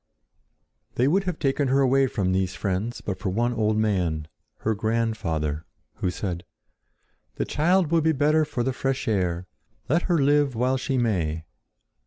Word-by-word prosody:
They 125 - +3
would 190 +7 +2
have 180 -4 -2
taken 140 0 +1
her 135 +2 +3
away 135 0 +4
from 95 -6 -1
these 95 -1 0
friends 100 +5 -2
but 95 -2 -4
for 95 0 -2
one 120 +6 0
old 110 -2 +1
man, 90 -8 0 0.3
her 110 - +1
grandfather, 105 -9 -1 0.3
who 90 - 0
said: 90 -1 -4 0.9
"The - - -1
child 170 +2 +2
will 165 -1 +4
be 160 +1 +3
better 155 +2 +3
for 140 -5 -2
the 130 +1 0
fresh 135 +1 -2
air. 90 -5 0 0.4
Let 165 +6 +3
her 175 - +4
live 145 -2 +3
while 130 +3 +1
she 130 +1 -1
may." 85 -10 0
115 Hz, 165 wpm, -25 LUFS, 95-140 Hz, 0.9 s, away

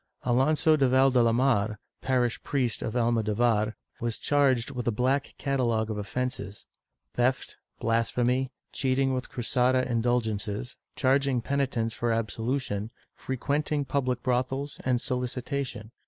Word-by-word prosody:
Alonso 145 +6 +3
de 135 -4 +3
Valdelamar, 120 -4 +3 0.2
parish 125 -3 +1
priest 125 -5 -1
of 110 - -3
Almo 120 -1 +2
dovar, 110 0 +1 0.2
was 115 -1 -2
charged 140 -4 +2
with 125 -3 -4
a - - +3
black 130 +5 0
catalogue 120 -5 0
of 105 - -3
offences 105 -2 -4 0.2
— - - -55
theft, 130 +1 0 0.2
blasphemy, 120 +3 +1 0.2
cheating 135 0 +1
with 130 0 -3
Cruzada 130 0 +1
indulgences, 115 -1 -1 0.2
charging 135 -1 +2
penitents 125 -3 -1
for 120 0 -1
absolution, 115 -1 -2 0.2
frequenting 145 +3 -1
public 130 -3 -1
brothels 130 +3 -1
and 130 -1 +2
soHcitation. 125 -2 -3
125 Hz, 120 wpm, -28 LUFS, 115-135 Hz, 0.2 s, Alonso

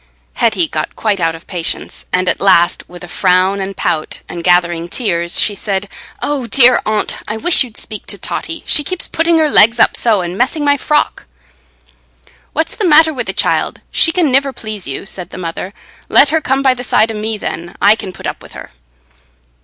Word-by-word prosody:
Hetty 210 -8 +1
got 155 - -4
quite 210 -3 -1
out 165 -1 0
of 165 - -13
patience, 175 -4 -5
and 185 0 0
at - - 0
last, 180 -3 +2
with 175 0 -11
a - - -8
frown 185 +2 +1
and 195 0 -5
pout, 165 -3 -2
and 170 -1 -7
gathering 175 -1 +1
tears, 170 -6 0
she 210 - +3
said, 200 0 -3 0.4
"Oh 280 -5 -2
dear, 250 +3 +5
Aunt, 215 -1 0
I 215 - -3
wish 325 +6 +5
you'd 235 -4 -11
speak 215 -2 -6
to - - -6
Totty; 330 -1 -5
she 295 - +5
keeps 370 +4 -5
putting 330 +1 +1
her 315 -1 +3
legs 230 -4 +4
up - - +4
so, 220 -5 +2
and 175 0 -5
messing 265 +7 0
my 285 0 +4
frock." 295 +2 -1 1.2
"What's 320 +2 -2
the 415 - 0
matter 315 0 +5
wi' 255 - -3
the - - -2
child? - - 0
She 330 - +3
can 330 -5 +1
niver 275 +1 +2
please 215 - -6
you," 135 +7 -5
said 180 -3 -7
the - - -10
mother. 180 +1 -5 0.4
"Let - - +5
her 320 +1 +1
come 270 -1 0
by 265 -1 +4
the 250 -1 -7
side 225 -2 +2
o' - - -6
me, 215 +1 -3
then. 175 -3 -6
I 205 +2 +5
can 205 -4 -7
put - - -11
up - - -4
wi' - - -14
her." - - -10
215 Hz, 210 wpm, -15 LUFS, 180-275 Hz, 1.2 s, dear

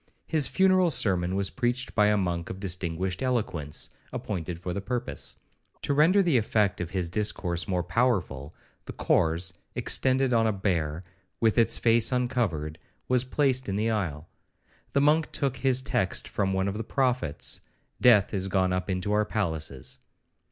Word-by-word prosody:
His 155 -4 +1
funeral 185 -2 +3
sermon 95 - +1
was 100 -1 -1
preached 125 +1 -1
by 105 -1 +4
a 105 0 +3
monk 85 -3 -2
of 95 - -6
distinguished 90 -1 -2
eloquence, 105 - -1 0.2
appointed 90 -4 -4
for 90 +1 -5
the 100 - -3
purpose. 125 +4 -4 0.5
To 140 - 0
render 170 +8 +5
the 165 -8 +3
effect 105 -4 +1
of 85 - -4
his 90 -2 -1
discourse 90 -3 -1
more 90 -2 0
powerful, 90 - -1 0.3
the - - -7
corse, 85 +3 +1 0.2
extended 130 -1 +1
on 115 -1 +3
a - - +2
bier, 85 -5 -1 0.4
with 110 -2 +2
its 115 - +3
face 115 +1 +3
uncovered, 105 - -1 0.3
was 125 -1 +2
placed 130 -2 0
in 95 - -1
the 110 +3 0
aisle. 85 -8 -3 0.7
The 140 - +3
monk 150 +2 +3
took 135 -2 -1
his 130 -1 +1
text 95 -9 0
from 95 -1 -1
one 95 0 0
of 100 +1 -3
the 110 - -3
prophets,—'Death 120 - +1
is 95 -1 -1
gone 95 -1 +1
up 90 +2 -2
into 95 +2 -1
our 105 0 +3
palaces.' 80 - -4
100 Hz, 160 wpm, -27 LUFS, 90-125 Hz, 0.7 s, render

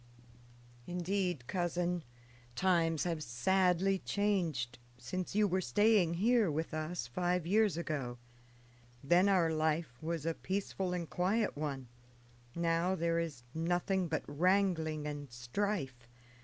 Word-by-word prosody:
"Indeed, 180 -5 -1
cousin, 175 +1 -1 0.5
times 165 -3 +2
have 165 -3 -2
sadly 185 +9 +2
changed 165 -14 -1 0.2
since 180 +11 -4
you 210 0 +4
were 185 0 +1
staying 190 - +3
here 225 +2 +3
with 160 +2 -2
us 155 -2 -3
five 175 +7 -1
years 205 -1 +3
ago. 140 -7 -3 0.9
Then 175 +7 +4
our 175 -4 +3
life 155 -5 -1
was 160 -1 -3
a 165 - +1
peaceful 190 0 -3
and 175 -2 -3
quiet 185 - 0
one; 140 -4 -4 0.7
now 170 +2 +1
there 170 -1 +1
is 155 -7 -4
nothing 175 +3 0
but 160 -1 -2
wrangling 160 -1 +1
and 145 -3 -5
strife. 130 - -3
170 Hz, 120 wpm, -34 LUFS, 155-185 Hz, 0.9 s, you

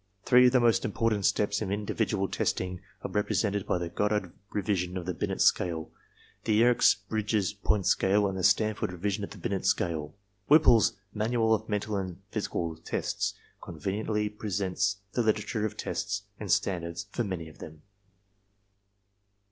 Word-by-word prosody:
Three 125 0 +7
of - - +4
the 130 - +4
most 120 -2 +3
important 110 -1 +1
steps 105 0 +1
in 100 -3 -2
individual 105 -1 -1
testing 90 0 -2 0.2
are - - -4
represented 105 -1 0
by - - +1
the 85 -1 -3
Goddard 105 -1 -1 0.2
revision 95 -3 -1
of 90 - -5
the 90 - -2
Binet 80 - -2
Scale, 80 -3 +2 0.5
the 110 - +1
Yerkes 120 +2 +5
Bridges 105 -3 0
Point 100 -1 0
Scale 100 +2 +3
and 95 - -3
the 95 - -3
Stanford 105 0 +2
revision 100 +3 -2
of - - -4
the - - -11
Binet 100 -2 -2
Scale. 80 -2 0 0.3
Whipple's 145 -7 +6 0.2
"Manual 110 +1 +1
of 110 0 -1
Mental 105 0 -1
and 95 -2 -4
Physical 85 -6 -2
Tests" - - -2 0.3
conveniently 105 +5 -2
presents 100 -1 -1 0.2
the 120 - +1
literature 110 0 0
of 105 0 -10
tests 105 -1 -3 0.2
and 105 -4 -3
stand 90 0 +1
ards 85 +3 -5
for 120 - -1
many 90 -6 -4
of 80 - -15
them. 80 -1 -11
100 Hz, 160 wpm, -29 LUFS, 90-110 Hz, 0.5 s, Three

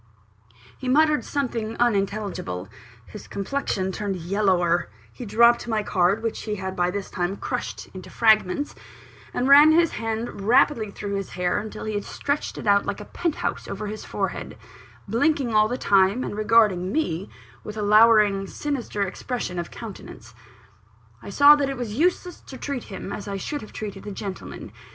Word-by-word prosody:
He 260 - -3
muttered 305 +2 +3
something 235 -6 -3
unintelligible; 200 - -1 0.4
his 210 - -11
complexion 200 -3 -2
turned 200 0 -3
yellower; 175 - +1 0.2
he 245 - -8
dropped 235 +3 +4
my 220 -2 0
card, 195 +3 +1
which 225 - -2
he 210 -1 -3
had 190 -1 -5
by 175 0 +1
this 200 +1 -5
time 180 +2 -2
crushed 100 -4 -4
into 185 - -9
fragments; 220 +4 +2 0.6
and 255 - -1
ran 290 +3 +8
his 335 +1 +4
hand 225 -2 -4
rapidly 240 -3 +3
through 200 0 -6
his 195 -1 -3
hair 180 +1 0
until 215 +1 -7
he 215 - -3
had 205 -1 -2
stretched 285 +1 -3
it - - -7
out 200 -1 +4
like 200 - -3
a 210 - -8
penthouse 335 +5 -3
over 200 +2 -5
his 215 +1 -6
forehead - - -4 0.5
blinking 255 +2 +1
all 215 0 +5
the 245 +3 -3
time, 200 +2 +3
and - - -4
regarding 210 -4 +3
me 195 - -1 0.3
with 210 0 -7
a 210 - -2
lowering, 210 -2 +5
sinister 255 -8 -3
expression 195 -1 -4
of 170 - -4
countenance. 185 - -10 0.9
I - - -9
saw 285 +7 +7
that 280 -2 0
it 270 - -4
was 235 -4 -4
useless 355 +5 0
to 265 - -8
treat 275 -3 -4
him 190 -2 -7
as 205 - -6
I 200 -1 -3
should 290 +9 -4
have 215 - -11
treated 205 -2 -7
a - - -4
gentleman. 195 -1 -7
215 Hz, 170 wpm, -24 LUFS, 195-245 Hz, 0.9 s, ran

